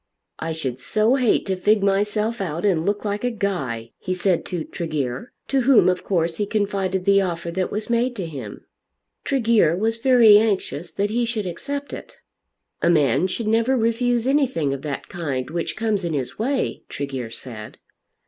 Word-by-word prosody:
"I 165 Hz, -, -3 dB
should 135 Hz, -6 st, -4 dB
so 215 Hz, -, +2 dB
hate 255 Hz, -5 st, +2 dB
to 190 Hz, -, -1 dB
fig 205 Hz, +2 st, +2 dB
myself 210 Hz, +3 st, +1 dB
out 170 Hz, 0 st, -3 dB
and 175 Hz, -4 st, +2 dB
look 205 Hz, +1 st, -1 dB
like 205 Hz, +1 st, -2 dB
a 245 Hz, -, +2 dB
guy," 135 Hz, -, -3 dB
he 185 Hz, -, -3 dB
said 180 Hz, -1 st, +1 dB
to 175 Hz, -4 st, -3 dB
Tregear, 155 Hz, -, -4 dB, 0.2 s
to 270 Hz, -1 st, +2 dB
whom 255 Hz, -4 st, +5 dB
of 180 Hz, 0 st, +1 dB
course 165 Hz, -3 st, 0 dB
he 205 Hz, -, -1 dB
confided 195 Hz, -3 st, -1 dB
the 200 Hz, 0 st, +5 dB
offer 170 Hz, -2 st, -3 dB
that 185 Hz, +1 st, -1 dB
was 210 Hz, +1 st, -3 dB
made 240 Hz, +1 st, +1 dB
to 190 Hz, -5 st, -4 dB
him. 135 Hz, -10 st, -8 dB, 0.6 s
Tregear 230 Hz, -, +3 dB
was 225 Hz, +3 st, 0 dB
very 230 Hz, -4 st, +7 dB
anxious 195 Hz, -6 st, -1 dB
that 205 Hz, +1 st, -2 dB
he 240 Hz, +2 st, +1 dB
should 230 Hz, -3 st, -2 dB
accept 280 Hz, -, -5 dB
it. -, -, -9 dB, 0.6 s
"A 170 Hz, -, +3 dB
man 150 Hz, 0 st, +3 dB
should 215 Hz, +5 st, -4 dB
never 230 Hz, +4 st, +2 dB
refuse 235 Hz, +1 st, +1 dB
anything 260 Hz, -, +1 dB
of 135 Hz, -, -5 dB
that 145 Hz, -2 st, -5 dB
kind 145 Hz, -8 st, -4 dB
which 170 Hz, 0 st, -3 dB
comes 220 Hz, -3 st, 0 dB
in 170 Hz, -2 st, -2 dB
his 130 Hz, +3 st, -4 dB
way," 265 Hz, +4 st, -1 dB
Tregear 135 Hz, -4 st, -4 dB
said. 110 Hz, -2 st, -9 dB
195 Hz, 180 wpm, -22 LUFS, 165-225 Hz, 0.6 s, very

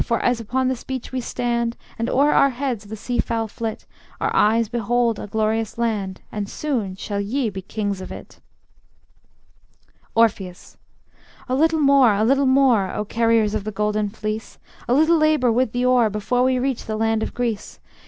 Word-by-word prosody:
For 235 Hz, -2 st, 0 dB
as 245 Hz, -1 st, +2 dB
upon 255 Hz, +4 st, -1 dB
this 255 Hz, -2 st, -2 dB
beach 260 Hz, -2 st, -5 dB
we 260 Hz, -1 st, -2 dB
stand, 235 Hz, -1 st, -2 dB, 0.2 s
And 230 Hz, -, -1 dB
o'er 285 Hz, +3 st, +3 dB
our 275 Hz, -, +5 dB
heads 250 Hz, -5 st, -3 dB
the 215 Hz, +2 st, -7 dB
sea 240 Hz, +3 st, -3 dB
fowl 225 Hz, -1 st, 0 dB
flit, 220 Hz, +1 st, -5 dB, 0.3 s
Our -, -, -1 dB
eyes 225 Hz, +2 st, +3 dB
behold 235 Hz, 0 st, 0 dB
a -, -, -6 dB
glorious 220 Hz, +1 st, -1 dB
land, 210 Hz, -5 st, -2 dB
And 205 Hz, -1 st, -4 dB
soon 235 Hz, -11 st, -2 dB
shall 200 Hz, +1 st, -4 dB
ye 225 Hz, +3 st, -1 dB
be 190 Hz, -1 st, -6 dB
kings 200 Hz, 0 st, -3 dB
of -, -, -8 dB
it. -, -, -11 dB, 1.8 s
Orpheus: 200 Hz, -5 st, 0 dB, 0.7 s
A 255 Hz, -, -2 dB
little 320 Hz, +4 st, +2 dB
more, 275 Hz, -6 st, +5 dB
a 210 Hz, -, +1 dB
little 270 Hz, +4 st, +3 dB
more, 255 Hz, -8 st, +3 dB
O 210 Hz, -, -3 dB
carriers 225 Hz, -1 st, +2 dB
of 215 Hz, -2 st, -2 dB
the 215 Hz, -, -4 dB
Golden 210 Hz, 0 st, -1 dB
Fleece, 215 Hz, +1 st, -5 dB, 0.3 s
A 245 Hz, -, +3 dB
little 315 Hz, +3 st, +4 dB
labor 310 Hz, -6 st, +3 dB
with 240 Hz, 0 st, +1 dB
the 245 Hz, +1 st, -1 dB
oar, 250 Hz, -3 st, +4 dB
Before 210 Hz, +4 st, -1 dB
we 255 Hz, 0 st, +2 dB
reach 260 Hz, -1 st, -2 dB
the 215 Hz, -1 st, -3 dB
land 225 Hz, 0 st, +1 dB
of -, -, -4 dB
Greece. 235 Hz, -4 st, -3 dB
230 Hz, 185 wpm, -22 LUFS, 215-255 Hz, 1.8 s, our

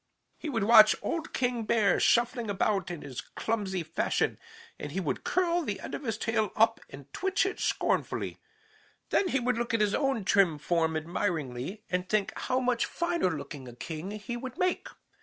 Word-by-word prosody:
"He 315 Hz, -, -4 dB
would 225 Hz, -7 st, 0 dB
watch 215 Hz, 0 st, +8 dB
old 330 Hz, -2 st, -2 dB
King 250 Hz, -2 st, 0 dB
Bear 220 Hz, -1 st, +3 dB
shuffling 235 Hz, -1 st, +2 dB
about 195 Hz, -2 st, 0 dB
in 175 Hz, -3 st, -6 dB
his 135 Hz, -4 st, -6 dB
clumsy 200 Hz, -5 st, -2 dB
fashion, 160 Hz, +1 st, 0 dB, 0.4 s
and -, -, -5 dB
he -, -, -2 dB
would -, -, -2 dB
curl 350 Hz, -1 st, +1 dB
the 210 Hz, -11 st, -3 dB
end -, -, -7 dB
of -, -, -3 dB
his 225 Hz, -2 st, -1 dB
tail 220 Hz, -3 st, 0 dB
up 225 Hz, +1 st, +4 dB
and 140 Hz, 0 st, -12 dB
twitch 385 Hz, +1 st, +1 dB
it 390 Hz, -, -3 dB
scornfully. -, -, -1 dB, 0.7 s
Then 390 Hz, -, +3 dB
he 275 Hz, -, +1 dB
would 245 Hz, -1 st, 0 dB
look 235 Hz, -1 st, 0 dB
at -, -, +1 dB
his 210 Hz, -1 st, +2 dB
own 270 Hz, -8 st, 0 dB
trim 190 Hz, -6 st, +4 dB
form 160 Hz, +1 st, +1 dB
admiringly 160 Hz, -, -3 dB
and 180 Hz, 0 st, -2 dB
think 215 Hz, -2 st, +1 dB
how 255 Hz, 0 st, 0 dB
much 250 Hz, -2 st, +1 dB
finer 340 Hz, -, 0 dB
looking 145 Hz, -5 st, -6 dB
a 120 Hz, -, -10 dB
king 160 Hz, +7 st, -6 dB
he 215 Hz, +3 st, -5 dB
would 255 Hz, +3 st, -6 dB
make. 365 Hz, -1 st, 0 dB
215 Hz, 185 wpm, -29 LUFS, 175-250 Hz, 0.7 s, watch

